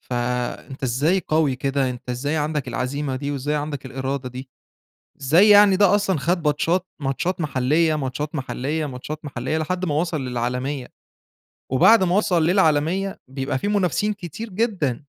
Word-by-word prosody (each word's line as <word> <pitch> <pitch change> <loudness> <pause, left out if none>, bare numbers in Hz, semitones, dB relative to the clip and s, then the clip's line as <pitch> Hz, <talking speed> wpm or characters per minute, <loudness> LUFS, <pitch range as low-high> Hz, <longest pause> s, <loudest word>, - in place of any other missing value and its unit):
فأنت 125 +3 -3
إزاي 145 +9 +1
قوي 155 -4 +2
كده؟ 135 0 0
أنت 125 0 -7
إزاي 145 +5 -2
عندك 150 -2 -2
العزيمة 135 +1 -2
دي، 145 +2 -4
وإزاي 145 +1 -2
عندك 145 -2 -4
الإرادة 130 0 -4
دي؟ 130 +2 -9 0.7
إزاي 165 +10 +5
يعني 205 -2 +7
ده 200 -1 +4
أصلًا 195 -5 +1
خد 170 +4 0
ماتشات، 165 +5 +1 0.2
ماتشات 170 +7 -1
محلية 150 +3 +1
ماتشات 145 +2 -4
محلية 150 +3 -2
ماتشات 145 +3 -7
محلية 135 +2 -3
لحد 180 +4 -2
ما 150 - -1
وصَل 160 -1 -1
للعالمية، 125 +2 -3 0.8
وبَعد 190 - +6
ما 180 0 +1
وصَل 175 -6 +2
للعالمية 180 +2 +1
بيبقى 135 +1 -3
في 205 - -2
منافسين 205 +1 +1
كتير 200 +4 -8
جدًا. 185 - 0
150 Hz, 150 wpm, -22 LUFS, 130-180 Hz, 0.8 s, يعني